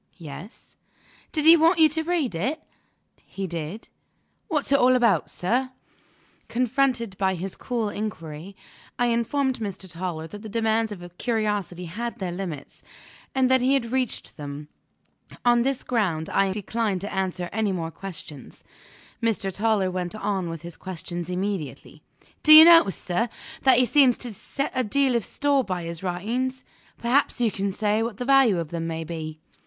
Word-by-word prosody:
"Yes." 170 Hz, -, -11 dB, 0.5 s
"Did 305 Hz, -2 st, -1 dB
he 330 Hz, +1 st, +10 dB
want 330 Hz, +2 st, +4 dB
you 320 Hz, -1 st, +7 dB
to 320 Hz, +2 st, 0 dB
read 320 Hz, -, -1 dB
it?" 260 Hz, -, -2 dB, 0.6 s
"He 195 Hz, -, -6 dB
did." 170 Hz, +4 st, -5 dB, 0.6 s
"What's 300 Hz, -6 st, -1 dB
it 280 Hz, -, +5 dB
all 255 Hz, +1 st, +5 dB
about, 235 Hz, -4 st, +2 dB
sir?" 255 Hz, +8 st, -1 dB, 0.7 s
Confronted 245 Hz, -3 st, 0 dB
by 190 Hz, -1 st, +1 dB
this 185 Hz, +2 st, -5 dB
cool 235 Hz, -4 st, -2 dB
inquiry, 185 Hz, -4 st, -6 dB, 0.4 s
I 245 Hz, -, +2 dB
informed 250 Hz, +3 st, 0 dB
Mr. 200 Hz, -3 st, -5 dB
Toller 165 Hz, -1 st, -5 dB
that 205 Hz, +5 st, -9 dB
the 220 Hz, -, -8 dB
demands 225 Hz, 0 st, +1 dB
of 175 Hz, -3 st, -9 dB
curiosity 210 Hz, -6 st, -1 dB
had 230 Hz, +8 st, -5 dB
their 185 Hz, -3 st, -3 dB
limits, 175 Hz, -6 st, -6 dB, 0.5 s
and 260 Hz, -1 st, +3 dB
that 260 Hz, -1 st, +4 dB
he 260 Hz, +2 st, +3 dB
had 235 Hz, -4 st, -1 dB
reached 260 Hz, -2 st, -2 dB
them. 145 Hz, 0 st, -7 dB, 0.8 s
On 240 Hz, 0 st, +5 dB
this 270 Hz, +1 st, 0 dB
ground, 185 Hz, -10 st, -1 dB
I 195 Hz, -1 st, +2 dB
declined 205 Hz, -1 st, -2 dB
to 200 Hz, -, -5 dB
answer 185 Hz, -2 st, -2 dB
any 215 Hz, 0 st, 0 dB
more 165 Hz, -3 st, -3 dB
questions. 165 Hz, -7 st, -10 dB, 0.6 s
Mr. 220 Hz, -4 st, 0 dB
Toller 205 Hz, -2 st, +1 dB
went 180 Hz, +1 st, -3 dB
on 200 Hz, -4 st, -2 dB
with 165 Hz, -1 st, -7 dB
his 170 Hz, 0 st, -9 dB
questions 175 Hz, -1 st, -6 dB
immediately. 180 Hz, -5 st, -4 dB, 0.4 s
"Do 310 Hz, -, +7 dB
you 315 Hz, +1 st, +12 dB
notice, 330 Hz, -, +7 dB
sir, 210 Hz, +7 st, -1 dB, 0.3 s
that 260 Hz, -2 st, +5 dB
he 255 Hz, -, +5 dB
seems 255 Hz, 0 st, +4 dB
to 240 Hz, -3 st, -6 dB
set 275 Hz, +7 st, -4 dB
a 255 Hz, -1 st, +1 dB
deal 260 Hz, +3 st, +1 dB
of 235 Hz, -, +1 dB
store 285 Hz, +3 st, +1 dB
by 180 Hz, -5 st, -3 dB
his 165 Hz, 0 st, -6 dB
writings? 235 Hz, +9 st, -2 dB, 0.3 s
Perhaps 250 Hz, +3 st, +1 dB
you 235 Hz, -3 st, +2 dB
can 200 Hz, 0 st, -2 dB
say 210 Hz, +2 st, 0 dB
what 225 Hz, -3 st, -3 dB
the 245 Hz, -, -4 dB
value 270 Hz, -7 st, +5 dB
of 165 Hz, -3 st, -3 dB
them 165 Hz, 0 st, -3 dB
may 165 Hz, 0 st, -3 dB
be?" 155 Hz, -1 st, -6 dB
210 Hz, 170 wpm, -25 LUFS, 180-250 Hz, 0.8 s, you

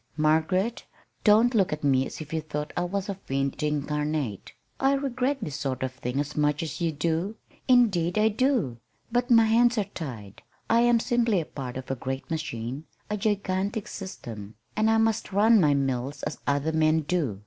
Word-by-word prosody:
"Margaret, 160 Hz, +8 st, +1 dB, 0.4 s
don't 225 Hz, +3 st, +5 dB
look 200 Hz, -5 st, +2 dB
at 150 Hz, 0 st, -4 dB
me 135 Hz, -2 st, +3 dB
as -, -, -8 dB
if 155 Hz, 0 st, -8 dB
you 160 Hz, -, 0 dB
thought 150 Hz, -1 st, -5 dB
I 175 Hz, -, 0 dB
was 195 Hz, +3 st, -3 dB
a 200 Hz, -, -2 dB
fiend 140 Hz, -6 st, -3 dB
incarnate. 150 Hz, -5 st, -2 dB, 0.3 s
I 270 Hz, +1 st, +3 dB
regret 270 Hz, 0 st, 0 dB
this 150 Hz, -5 st, -4 dB
sort 135 Hz, -3 st, -3 dB
of 130 Hz, -, -2 dB
thing 125 Hz, +1 st, -3 dB
as 145 Hz, +1 st, -3 dB
much 150 Hz, 0 st, +1 dB
as 165 Hz, +2 st, -5 dB
you 165 Hz, -1 st, +1 dB
do. 165 Hz, +7 st, -1 dB, 0.3 s
Indeed 205 Hz, -8 st, +3 dB
I 215 Hz, +1 st, +4 dB
do. 220 Hz, -, 0 dB, 0.3 s
But 245 Hz, +2 st, +1 dB
my 230 Hz, -2 st, +6 dB
hands 235 Hz, +2 st, +4 dB
are 210 Hz, -, +3 dB
tied. 125 Hz, -, -8 dB, 0.3 s
I 230 Hz, -, +5 dB
am 240 Hz, 0 st, +4 dB
simply 235 Hz, -4 st, +2 dB
a 160 Hz, -, -3 dB
part 130 Hz, -4 st, -6 dB
of 130 Hz, 0 st, -6 dB
a -, -, 0 dB
great 130 Hz, +3 st, -5 dB
machine 135 Hz, -3 st, -4 dB, 0.3 s
a -, -, +1 dB
gigantic 200 Hz, 0 st, -1 dB
system, 115 Hz, -, -8 dB, 0.2 s
and 215 Hz, +1 st, +2 dB
I 225 Hz, -, +4 dB
must 225 Hz, -1 st, +1 dB
run 215 Hz, +2 st, +5 dB
my 145 Hz, -3 st, +4 dB
mills 135 Hz, +1 st, -2 dB
as -, -, -4 dB
other 145 Hz, +2 st, +1 dB
men 160 Hz, 0 st, +3 dB
do. 145 Hz, -, -1 dB
160 Hz, 190 wpm, -26 LUFS, 140-215 Hz, 0.4 s, my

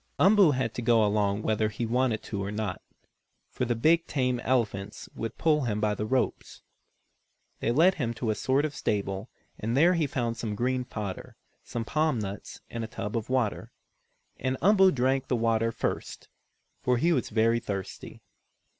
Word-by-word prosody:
Umboo 195 Hz, -2 st, +6 dB
had 125 Hz, -3 st, -1 dB
to 120 Hz, -, -4 dB
go 115 Hz, -2 st, +4 dB
along 105 Hz, 0 st, +1 dB
whether 110 Hz, 0 st, +1 dB
he 110 Hz, +3 st, -3 dB
wanted 120 Hz, -1 st, 0 dB
to 100 Hz, -2 st, -4 dB
or 100 Hz, -, -4 dB
not, 105 Hz, -3 st, -3 dB, 0.7 s
for 125 Hz, -, -2 dB
the 120 Hz, 0 st, 0 dB
big, 165 Hz, +8 st, +3 dB
tame 125 Hz, -3 st, 0 dB
elephants 105 Hz, -5 st, -1 dB
would 115 Hz, 0 st, -5 dB
pull 150 Hz, -4 st, +2 dB
him 105 Hz, -3 st, -1 dB
by 105 Hz, 0 st, +1 dB
the 105 Hz, +1 st, -3 dB
ropes. 130 Hz, +2 st, -2 dB, 1.0 s
They 115 Hz, -, 0 dB
led 165 Hz, +9 st, +5 dB
him 115 Hz, -2 st, -1 dB
to 110 Hz, -1 st, -1 dB
a -, -, +1 dB
sort 135 Hz, +6 st, +1 dB
of 150 Hz, -, -3 dB
stable, 100 Hz, -3 st, -2 dB, 0.3 s
and 115 Hz, +4 st, -1 dB
there 170 Hz, +5 st, +5 dB
he 165 Hz, -4 st, +1 dB
found 120 Hz, -4 st, -2 dB
some 105 Hz, -3 st, -3 dB
green 125 Hz, +3 st, -1 dB
fodder, 105 Hz, -6 st, -6 dB, 0.3 s
some 115 Hz, -1 st, -4 dB
palm 155 Hz, 0 st, +1 dB
nuts 100 Hz, -2 st, -6 dB
and 115 Hz, -1 st, -5 dB
a -, -, -4 dB
tub 105 Hz, 0 st, -5 dB
of 115 Hz, 0 st, -3 dB
water. 125 Hz, -5 st, -1 dB, 0.7 s
And 130 Hz, 0 st, -2 dB
Umboo 190 Hz, 0 st, +5 dB
drank 130 Hz, 0 st, 0 dB
the 125 Hz, -, +1 dB
water 115 Hz, -1 st, +1 dB
first, -, -, -4 dB, 0.5 s
for 125 Hz, -1 st, +2 dB
he 170 Hz, +8 st, +2 dB
was 130 Hz, -7 st, -1 dB
very 115 Hz, +1 st, +2 dB
thirsty. 100 Hz, -4 st, -6 dB
115 Hz, 180 wpm, -28 LUFS, 105-130 Hz, 1.0 s, Umboo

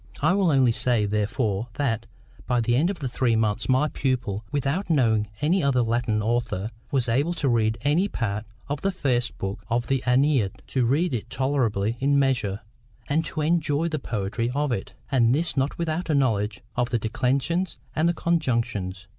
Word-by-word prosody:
I 155 Hz, +5 st, +3 dB
will 195 Hz, -3 st, +3 dB
only 130 Hz, -4 st, +4 dB
say, 115 Hz, -2 st, +2 dB
therefore, 105 Hz, +1 st, -1 dB
that, 125 Hz, -7 st, -1 dB, 0.4 s
by 125 Hz, -1 st, +2 dB
the 120 Hz, +1 st, +1 dB
end 155 Hz, +8 st, +3 dB
of 200 Hz, -, -3 dB
three 125 Hz, -4 st, 0 dB
months, 110 Hz, +1 st, 0 dB
my 130 Hz, +4 st, +3 dB
pupil, 125 Hz, -8 st, -2 dB
without 145 Hz, +8 st, -1 dB
knowing 115 Hz, -9 st, +3 dB
any 175 Hz, +6 st, +2 dB
other 135 Hz, -4 st, +2 dB
Latin 115 Hz, -2 st, 0 dB
author, 115 Hz, -2 st, -1 dB, 0.2 s
was 130 Hz, -3 st, +1 dB
able 140 Hz, +9 st, +1 dB
to 145 Hz, -, -1 dB
read 115 Hz, -2 st, +2 dB
any 150 Hz, +9 st, +2 dB
part 105 Hz, -, -3 dB, 0.2 s
of 145 Hz, 0 st, -3 dB
the 195 Hz, -, +1 dB
first 125 Hz, -10 st, -1 dB
book 95 Hz, +1 st, -4 dB
of 120 Hz, +1 st, 0 dB
the 135 Hz, -1 st, 0 dB
AEneid—to 130 Hz, -2 st, +1 dB
read 145 Hz, +6 st, +1 dB
it 115 Hz, -1 st, -3 dB
tolerably 120 Hz, -6 st, 0 dB
in 140 Hz, +1 st, +2 dB
measure, 125 Hz, -8 st, +1 dB, 0.5 s
and 155 Hz, +3 st, +2 dB
to 155 Hz, -, -3 dB
enjoy 160 Hz, 0 st, +1 dB
the 155 Hz, -2 st, -2 dB
poetry 115 Hz, 0 st, -2 dB
of 145 Hz, -1 st, 0 dB
it—and 120 Hz, +3 st, 0 dB
this 165 Hz, +3 st, -1 dB
not 135 Hz, +1 st, 0 dB
without 170 Hz, +1 st, -2 dB
a 155 Hz, -, +3 dB
knowledge 105 Hz, -7 st, +1 dB
of 120 Hz, 0 st, 0 dB
the 120 Hz, -, +1 dB
declensions 130 Hz, -, -1 dB, 0.2 s
and 170 Hz, +2 st, +2 dB
conjugations. 115 Hz, -, -1 dB
125 Hz, 170 wpm, -25 LUFS, 115-145 Hz, 0.5 s, only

